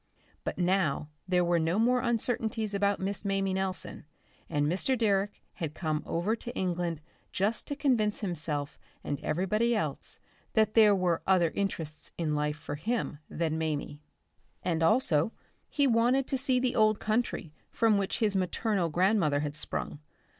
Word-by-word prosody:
But - - -3
now 175 -5 +1 0.2
there 180 -1 +2
were 170 0 +2
no 165 +4 +1
more 250 +3 +3
uncertainties 225 -2 0
about 200 0 +1
Miss 195 +2 -2
Mamie 195 -1 0
Nelson, 190 -2 -3 0.5
and 145 -2 +1
Mr. 195 - +1
Direck 205 -3 +1
had 160 -4 -5
come 155 -3 -1
over 180 +7 0
to 240 - -6
England 175 -3 -1 0.3
just 210 +4 -1
to 285 - -3
convince 235 -8 +1
himself 155 -6 -3 0.2
and 145 -2 -3
everybody 215 +7 +1
else 215 - -3 0.4
that 215 -1 +3
there 215 -3 +6
were 180 -3 +1
other 180 -4 +4
interests 165 -6 -3
in 160 -3 -1
life 150 0 -1
for 150 -1 -6
him 210 -3 -2
than 160 -1 -1
Mamie.... 150 -2 -3 0.6
And 165 -2 0
also, 170 - +3 0.4
he 285 - +2
wanted 250 +2 +3
to 275 - 0
see 260 -1 +2
the 250 -1 0
old 215 -2 +4
country 215 -8 -1 0.2
from 220 -3 +3
which 195 - -1
his 210 -3 +1
maternal 190 0 0
grandmother 175 -4 +2
had 150 -1 -3
sprung. 155 - -2
190 Hz, 155 wpm, -29 LUFS, 160-220 Hz, 0.6 s, there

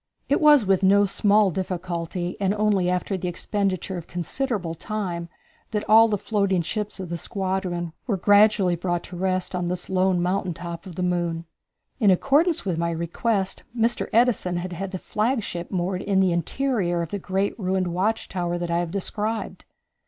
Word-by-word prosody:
It 285 - +2
was 295 -6 +6
with 190 -1 +3
no 200 +1 +5
small 205 0 +3
difficulty, 175 -1 -3
and 195 0 +1
only 205 -4 +2
after 180 +2 -1
the 180 - -4
expenditure 190 0 -2
of 170 - -8
considerable 180 - -2
time, 175 -2 -4 0.4
that 210 -2 -3
all 225 +1 +7
the 210 -2 0
floating 200 -4 0
ships 210 +3 -4
of 185 -2 -5
the 170 0 -3
squadron 185 -3 -2
were 205 -5 0
gradually 205 -1 +4
brought 175 0 -2
to 180 - -9
rest 185 +1 -1
on 180 -1 -1
this 180 +1 -3
lone 185 -1 +2
mountain 180 0 -1
top 170 +2 -7
of 180 - -9
the 180 - -2
moon. 170 -2 -1 0.5
In 210 -5 +4
accordance 285 - +3
with 175 -4 -1
my 170 0 0
request, 190 +4 -1 0.2
Mr. 230 +1 +1
Edison 225 -6 +2
had 180 +2 -4
the 185 - -4
flagship 210 -4 -2
moored 185 0 -1
in 195 -1 +1
the 190 -2 +3
interior 175 - 0
of 165 - -6
the 205 - -2
great 195 +2 -1
ruined 185 -2 0
watch 195 +6 0
tower 175 -2 -2
that 175 -1 -3
I 170 - +2
have 175 -1 -2
described. 210 +4 -3
185 Hz, 175 wpm, -24 LUFS, 175-205 Hz, 0.5 s, all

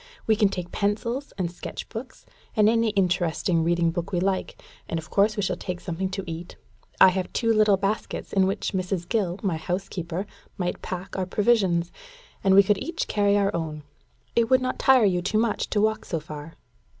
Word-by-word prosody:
We 220 - +4
can 210 -2 +3
take 180 -2 -5
pencils 230 +7 -1
and 175 -3 -1
sketch 175 - -7
books, 245 +3 -8 0.3
and 210 -2 +5
any 230 0 +3
interesting 180 -3 +1
reading 170 0 +2
book 170 +1 -4
we 180 - +1
like; 190 +1 -1 0.3
and 165 - -1
of 155 -1 -7
course 210 +2 +3
we 205 - 0
shall - - 0
take 180 -1 -5
something 185 +2 -3
to 195 +1 -4
eat. 170 0 -7 0.4
I 190 - +9
have 185 0 -2
two 230 -2 +2
little 215 -2 +4
baskets, 200 +3 -3
in 190 -1 +4
which 195 - -2
Mrs. 185 -2 -2
Gill, 195 -5 0
my 185 -5 0
house 180 +4 -3
keeper, 175 +2 -4 0.3
might 180 -1 -2
pack 185 0 -6
our 185 -1 -2
provisions, 190 -5 +2 0.5
and 190 -1 +5
we 200 - +9
could 200 0 +2
each 335 0 -3
carry 205 -1 +2
our 200 -1 +1
own. 155 -2 -4 0.5
It 230 -1 +3
would 260 - +5
not 255 0 -3
tire 260 -4 +5
you 180 -3 +2
too 195 +4 0
much 225 -1 0
to 210 - +1
walk 220 0 +1
so 165 - -2
far?" 150 +1 -9
190 Hz, 200 wpm, -25 LUFS, 175-215 Hz, 0.5 s, I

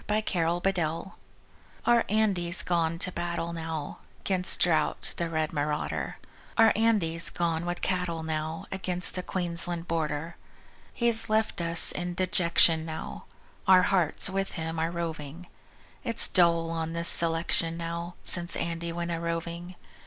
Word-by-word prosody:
Andy's 215 +1 0
Gone 170 -1 0
With 175 - -9
Cattle 165 +1 -4 0.7
Our 235 -1 +3
Andy's 190 -5 +1
gone 165 -1 -1
to 185 - -4
battle 170 -1 -4
now 160 -3 -6 0.2
'Gainst 185 -1 +1
Drought, 160 -3 0
the 170 -1 -3
red 160 -1 -3
marauder; 150 0 -4 0.4
Our 225 -1 +5
Andy's 200 -8 +1
gone 170 0 -3
with 175 0 -5
cattle 180 -3 -2
now 160 0 -5
Across 180 -2 +1
the 180 - -3
Queensland 175 -1 -2
border. 160 0 -4 0.5
He's 235 -2 +3
left 215 -3 -1
us 170 0 +4
in 175 0 -5
dejection 170 -3 +2
now; 160 -1 -8 0.4
Our 185 -1 +6
hearts 180 -5 +3
with 195 +1 -3
him 160 -1 -5
are 165 +1 -1
roving. 165 -1 -7 0.6
It's 230 -4 +4
dull 170 -2 +2
on 165 0 -4
this 170 0 +3
selection 165 0 +6
now, 170 +1 -6
Since 175 0 +4
Andy 170 0 -4
went 170 0 -5
a 165 - -3
droving. 170 +1 -6
170 Hz, 145 wpm, -26 LUFS, 165-180 Hz, 0.7 s, Our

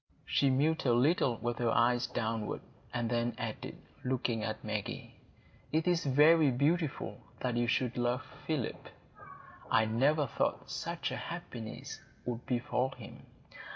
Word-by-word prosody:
She 140 - +3
mused 150 +5 +2
a 120 - +5
little 130 -2 +3
with 120 +1 -2
her 120 -1 +2
eyes 120 +1 +3
downward, 110 -1 -2 0.3
and 120 -1 -1
then 120 0 0
added, 110 -1 -5 0.3
looking 125 -3 0
at 110 - -3
Maggie, 105 -3 -4 0.6
"It 160 +3 +1
is 175 -3 +2
very 150 +3 +6
beautiful 145 +4 0 0.2
that 125 -2 0
you 120 0 +2
should 125 +1 +1
love 120 +1 0 0.2
Philip; 150 -7 -2 0.8
I 110 - +4
never 140 +7 +3
thought 120 - -1
such 170 0 -3
a - - -3
happiness 150 -11 -6 0.3
would 120 -1 -4
befall 125 +1 0
him. - - -11
125 Hz, 140 wpm, -32 LUFS, 115-150 Hz, 0.8 s, very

